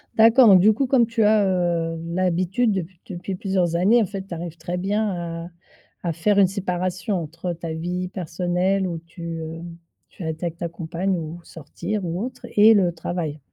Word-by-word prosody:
D'accord, 230 +3 +7
donc 190 -3 +8
du 215 +3 +6
coup, 265 +4 0
comme 250 -3 +4
tu 230 -1 0
as, 210 0 +5
heu, 170 -3 0
l'habitude 185 +5 +1
dep 190 -5 -1 0.2
depuis 185 0 -5
plusieurs 180 -3 0
années, 210 +7 +4
en - - +2
fait, 195 0 -6
tu 180 - -7
arrives 170 0 -6
très 175 +2 -4
bien 180 -4 -2
à - - -8 0.6
à 170 - -1
faire 200 +6 +1
une 195 - +6
séparation 185 0 -2
entre 165 +3 -5
ta 165 -1 -5
vie 180 +3 -3
personnelle 180 +2 -1
où 170 -2 -4
tu, 170 0 -7
heu, 160 +1 -6 0.5
tu 180 - -10
es - - -4
avec 160 +1 -3
ta 170 0 -3
compagne 175 +3 -2
ou 165 +1 -6
sortir 175 +6 -5
ou 175 +5 -2
autre 250 0 -7
et 215 +2 +8
le 180 -4 +3
travail. 165 -2 -4
180 Hz, 190 wpm, -23 LUFS, 170-195 Hz, 0.6 s, donc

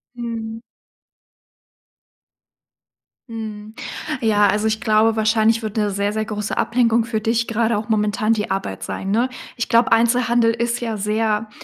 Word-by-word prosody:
Mhm. 230 -2 -5 2.7
Mhm, 215 -2 -7 0.5
ja, 210 -3 +4
also, 210 +2 +1
ich 215 0 0
glaube, 220 +1 +3
wahrscheinlich 220 +1 +3
wird 215 -2 -5
'ne 210 -1 +1
sehr 200 +1 -1
sehr 220 0 -1
große 210 -1 -4
Ablenkung 235 0 +2
für 225 -1 -2
dich 225 +2 0
gerade 230 0 +1
auch 210 +2 -5
momentan 215 +1 +1
die 210 -2 -2
Arbeit 195 0 -3
sein, 195 - -4
ne? 235 +4 +2 0.3
Ich 235 - -2
glaube, 235 +2 +3
Einzelhandel 235 0 +3
ist 235 +1 -1
ja 230 -2 -3
sehr 215 +1 -1
220 Hz, 145 wpm, -20 LUFS, 210-230 Hz, 2.7 s, ja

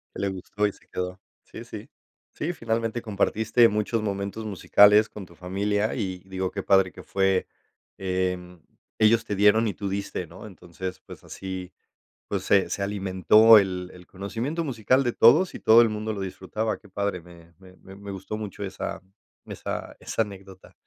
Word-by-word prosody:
Que - - -6
le 100 - 0
gustó 100 +2 -2
y 100 - -2
se - - -23
quedó. 90 +1 -5 0.2
Sí, - - -10
sí. - - -9 0.5
Sí, 170 - -3
finalmente 115 -4 -2
compartiste 110 +2 +2
muchos 105 +2 -1
momentos 100 +1 -3
musicales 105 +1 +5
con 105 -2 -9
tu 85 - -18
familia, 100 +4 -1
y 95 -6 -4
digo: 95 -1 -3
"Qué 100 - -5
padre 95 -2 +3
que - - -11
fue". 95 -1 +1 0.5
Em, 90 -2 -3 0.4
ellos 115 +1 +4
te 105 - -3
dieron 105 +3 +4
y 100 - -3
tú 100 - -4
diste, 100 -2 -4
¿no? 85 +6 -12
Entonces, 90 -1 -8
pues - - -13
así, 95 -1 -7 0.6
pues - - -2
se 100 -1 +3
se - - -3
alimentó 100 +3 +5
el 90 -2 -3
el 90 -1 -15
conocimiento 115 - -4
musical 130 -1 +1
de 120 -2 -1
todos 155 +11 +5
y - - -6
todo 115 +2 +7
el 115 - +3
mundo 110 +1 -3
lo 100 - -5
disfrutaba. 95 +3 -3
Qué 105 - -19
padre, 100 -1 -2
me 85 0 -17
me 95 -1 -16
me 100 +1 -11
gustó 95 +2 -6
mucho 105 -1 -6
esa 95 -2 -5 0.4
esa - - -6
esa - - -2
anécdota. 95 -2 -13
100 Hz, 175 wpm, -25 LUFS, 95-110 Hz, 0.6 s, todo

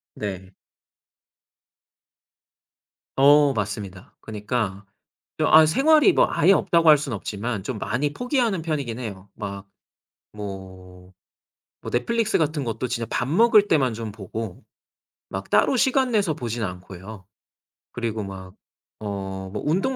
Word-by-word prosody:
네. 95 -3 -6 2.7
어 145 +1 +6
맞습니다. 100 -3 -5
그니까 105 -2 -3 0.5
아 155 0 +6
생활이 305 - +5
뭐 - - +4
아예 180 +6 +4
없다고 170 -3 +3
할 150 -2 +8
수는 135 -6 -4
없지만 105 +1 -4
좀 110 0 -5
많이 145 +7 -1
포기하는 245 - 0
편이긴 140 -8 -3
해요. 100 -5 -7
막 100 -1 -7 0.7
뭐 95 -2 -9 0.7
뭐 - - -7
넷플릭스 220 - +1
같은 150 -2 0
것도 115 +2 -3
진짜 115 -1 -3
밥 120 - -1
먹을 210 +5 +5
때만 130 -7 +2
좀 110 -2 -6
보고 105 -1 -7 0.7
막 95 0 -6
따로 260 - +3
시간 265 +1 +2
내서 205 -8 +1
보지는 120 -5 -3
않고요. 95 +2 -9 0.7
그리고 115 -3 -3
막 95 -1 -9 0.5
어 95 -2 -5
뭐 105 - -5
운동 195 - +1
115 Hz, 240 characters per minute, -23 LUFS, 100-155 Hz, 2.7 s, 할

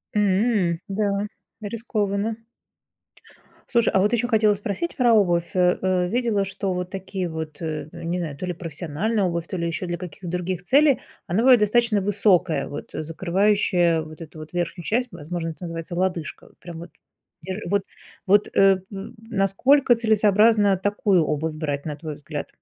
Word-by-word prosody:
М. 200 -4 +2
Да, 200 0 -1 0.3
рискованно. 210 -1 -2 1.3
Слушай, 235 -2 +3
а 190 - +4
вот 210 +4 +2
еще 240 +1 +1
хотела 215 -2 +4
спросить 205 - -4
про 245 -3 +4
обувь, 175 -5 +2
а, 180 -1 +3
э. 185 -1 +1
Видела, 225 -2 0
что 190 -1 -3
вот 180 0 -3
такие 190 -1 -4
вот, 160 -1 -6
э, 155 -2 -4
э, 170 -1 -10
не 170 +2 -1
знаю, 155 -5 -4
то 185 - -4
ли 180 - -2
профессиональная 170 +6 -2
обувь, 170 -1 -2
то 185 - -4
ли 170 0 -1
еще 165 +2 -3
для 175 - -2
каких 180 0 -9
других 180 0 -3
целей, 280 +5 +4 0.3
она 180 +5 0
бывает 250 -1 +6
достаточно 215 0 +3
высокая, 195 -4 +2
вот 145 - -7
закрывающая 175 +1 +1
вот 155 +1 -10
эту 155 0 -10
вот 155 +1 -10
верхнюю 175 0 -3
часть, 245 +2 0
возможно, 165 +1 -5
это 160 - -9
называется 165 +1 -6
лодыжка. 180 -3 -3
Прям 170 -2 -9
вот 170 - -10 0.5
дер 190 +5 -5
вот 200 -1 +1 0.4
вот, 205 +1 +4
э, 195 -1 +6
м, 205 +4 -8
насколько 230 +5 +3
целесообразно 215 -2 +4
такую 200 -3 +2
обувь 155 +1 -1
брать, 145 -2 -3
на 150 -2 -4
твой 155 -1 -6
взгляд? 145 +1 -6
185 Hz, 165 wpm, -23 LUFS, 170-210 Hz, 1.3 s, бывает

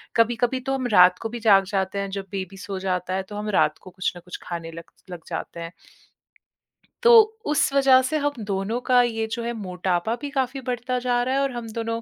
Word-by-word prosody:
कभी-कभी 240 +2 +2
तो 270 +1 -2
हम 255 -2 -2
रात 180 0 +7
को 225 - -4
भी 240 +1 -6
जाग 200 -3 +5
जाते 190 +1 -1
हैं, 195 0 -3
जब 195 - -5
बेबी 195 0 -5
सो 195 -1 -6
जाता 185 -1 -2
है, 190 - -2
तो 205 +2 -11
हम 210 0 -4
रात - - +2
को 185 - -12
कुछ 185 0 -2
ना - - -9
कुछ 180 - -8
खाने 165 -1 -6
लग 165 0 -11 0.2
लग 175 -2 -7
जाते 170 - -6
हैं। 165 0 -6 1.3
तो 475 - +7 0.3
उस 295 -2 +2
वजह 270 -2 +6
से 310 +5 -1
हम 290 0 0
दोनों 200 +4 -2
का 250 -1 +6
ये 225 -2 -1
जो 235 0 -3
है, 235 - -2
मोटापा 185 0 -2
भी 290 - -4
काफ़ी 265 -1 -2
बढ़ता 250 0 -2
जा 245 -1 0
रहा 260 +2 -1
है 275 - +2
और 275 -1 0
हम 240 -2 -6
दोनों 230 0 -3
225 Hz, 230 wpm, -24 LUFS, 190-255 Hz, 1.3 s, रात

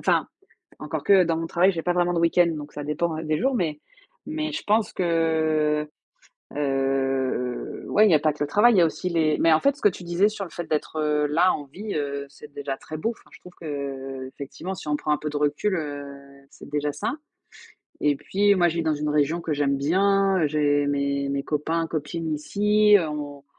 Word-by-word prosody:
Enfin, - - +1 0.5
encore - - -4
que 195 -2 +6
dans 165 -1 0
mon 165 - -3
travail, 180 +4 +3
j'ai 165 -3 -4
pas 175 - +1
vraiment 175 0 +1
de 170 - 0
week-end 170 +1 +4
donc 145 0 -9
ça 145 - -5
dépend 155 +2 -2
des 155 0 0
jours, 265 +2 +1
mais 160 -8 -1 0.5
mais 310 0 -3
je 320 - -4
pense 215 -1 +2
que, 160 -3 +1 0.7
heu, - - -9
heu, 135 -2 -1
ouais, 215 +1 +5
il - - +4
y - - +5
a - - +6
pas 155 0 +1
que 150 - -2
le 145 - -6
travail, 230 +8 +5
il 195 - +4
y - - +7
a - - +6
aussi 180 +3 -3
les 160 -3 +1
mais 165 - +4
en 155 - +3
fait 280 0 +3
ce - - -17
que - - +6
tu 180 -2 -7
disais 175 +4 +2
sur 210 -2 -5
le 175 - -11
fait 175 - -6
d'être, 155 0 -2
heu, 150 -1 +1
là 180 +5 +3
en 145 - -5
vie, 200 +10 -7
heu, 140 -1 -3
c'est 145 +1 -14
déjà 140 -1 -4
très 155 +2 -8
beau. 225 - -1
Enfin - - -21
je - - -15
trouve 180 - -14
qu'effectivement 140 +2 -6
si 165 - -9
on 150 - +1
prend 150 +1 -1
un - - +3
peu 150 - -4
de 150 - -4
recul, 150 +7 0
heu, 145 -4 -4 0.5
c'est - - -13
déjà 145 0 -1
ça 190 - -3 0.9
et 145 -1 +2
puis 200 +8 +2
moi 175 -2 +3
je 170 - -3
vis 170 - 0
dans 160 -1 +1
une 150 +1 -3
région 150 +3 +1
que 160 -2 -2
j'aime 140 -1 +1
bien, 195 +5 +2
heu, - - +4
j'ai 145 -1 +1
mes 140 0 -1
mes 140 0 -1
copains, 160 +3 -1
copines 160 +1 -4
ici, 210 +6 +3
heu, 165 - -2
on 145 -2 -6
155 Hz, 230 wpm, -24 LUFS, 145-180 Hz, 0.9 s, y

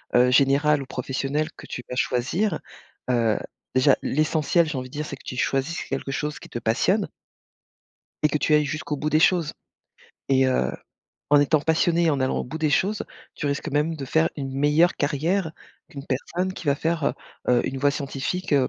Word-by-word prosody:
heu, 125 +1 +5
générale 140 +2 +4
ou - - -6
professionnelle 135 +4 -2
que - - -12
tu 125 - -6
vas 125 - -4
choisir, 155 - 0 0.5
heu 115 -3 +2 0.4
déjà 130 +2 +5
l'essentiel, 155 +3 +2
j'ai 150 - -3
envie 130 0 -5
de - - -20
dire, 150 +1 -3
c'est - - -7
que - - -19
tu 125 - -5
choisisses 135 +6 -1
quelque 135 - -4
chose 150 +2 -3
qui - - -12
te 120 - -4
passionne 185 - +1 1.1
et 150 - +5
que 150 - +1
tu 155 - +1
ailles 150 0 +4
jusqu'au 150 0 -3
bout 150 +2 -1
des 155 +1 +3
choses 170 -3 +3 0.8
et 135 -1 +4
heu, 65 - +1 0.6
en 145 - +7
étant 145 +1 +3
passionné, 165 +2 +2
et 160 - +4
en 140 -2 0
allant 130 - +1
au - - -2
bout 155 +6 -6
des 155 -1 +1
choses, 200 +8 +1 0.3
tu 150 - -4
risques 140 -1 -2
même 150 +3 0
de 140 - -5
faire 80 -9 +2
une 135 -2 -4
meilleure 150 +5 +3
carrière 160 +4 0 0.4
qu'une 140 -1 -8
personne 180 +8 -2
qui 175 - -9
va 140 - +4
faire, 160 0 -1
heu - - +2 0.4
heu, 120 - +2
une 135 - -3
voie 145 +1 +3
scientifique, 145 +5 -3
heu, 135 -3 +4
145 Hz, 200 wpm, -24 LUFS, 135-160 Hz, 1.1 s, en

